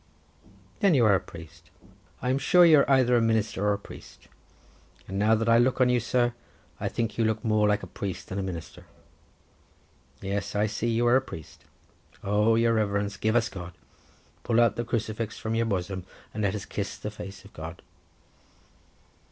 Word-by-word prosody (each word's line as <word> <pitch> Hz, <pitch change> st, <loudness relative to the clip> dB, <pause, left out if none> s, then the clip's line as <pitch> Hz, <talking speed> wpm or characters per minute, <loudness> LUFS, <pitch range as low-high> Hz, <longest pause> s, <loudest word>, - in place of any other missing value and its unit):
"Then 195 Hz, -5 st, +4 dB
you 120 Hz, -4 st, +4 dB
are 105 Hz, -, +5 dB
a 95 Hz, -, +3 dB
priest; 85 Hz, +1 st, -13 dB, 0.5 s
I 125 Hz, -, +1 dB
am 135 Hz, -, +1 dB
sure 180 Hz, +5 st, +5 dB
that -, -, +6 dB
you 155 Hz, -2 st, +7 dB
are 140 Hz, -, +2 dB
either 130 Hz, -2 st, +4 dB
a 120 Hz, -, +4 dB
minister 110 Hz, -3 st, 0 dB
or 105 Hz, 0 st, +3 dB
a -, -, -1 dB
priest; 100 Hz, -, -14 dB, 0.8 s
and 95 Hz, +1 st, -4 dB
now 110 Hz, +2 st, +4 dB
that 115 Hz, +1 st, -1 dB
I 115 Hz, 0 st, +5 dB
look 130 Hz, +2 st, +2 dB
on 125 Hz, -1 st, +4 dB
you, 125 Hz, 0 st, +3 dB
sir, 120 Hz, +1 st, +1 dB, 0.5 s
I -, -, -2 dB
think 115 Hz, -2 st, -3 dB
you -, -, +3 dB
look 110 Hz, +1 st, -1 dB
more 110 Hz, -1 st, +3 dB
like 105 Hz, 0 st, +1 dB
a -, -, -4 dB
priest 95 Hz, -2 st, -6 dB
than 95 Hz, -, -3 dB
a -, -, -1 dB
minister. 90 Hz, -4 st, -7 dB, 1.3 s
Yes, 100 Hz, +1 st, -3 dB
I 105 Hz, +1 st, +2 dB
see 110 Hz, +2 st, -2 dB
you 115 Hz, +1 st, +1 dB
are 120 Hz, +2 st, +5 dB
a -, -, +1 dB
priest. 80 Hz, -, -11 dB, 0.6 s
Oh, 105 Hz, +3 st, +3 dB
your 115 Hz, 0 st, +3 dB
Reverence, 100 Hz, -2 st, 0 dB
give 110 Hz, +3 st, 0 dB
us 120 Hz, -2 st, +3 dB
God! 90 Hz, -2 st, -8 dB, 0.7 s
pull 115 Hz, -1 st, +1 dB
out 115 Hz, -1 st, +4 dB
the 120 Hz, -, -2 dB
crucifix 110 Hz, -1 st, -3 dB
from 110 Hz, -, -3 dB
your 115 Hz, 0 st, +1 dB
bosom, 95 Hz, -2 st, -2 dB, 0.3 s
and 110 Hz, -, -4 dB
let 100 Hz, 0 st, 0 dB
us 100 Hz, -, -5 dB
kiss 100 Hz, -1 st, -4 dB
the 105 Hz, -, -6 dB
face 100 Hz, -2 st, -9 dB
of 100 Hz, -, -16 dB
God!" 80 Hz, +2 st, -8 dB
110 Hz, 200 wpm, -27 LUFS, 100-115 Hz, 1.3 s, you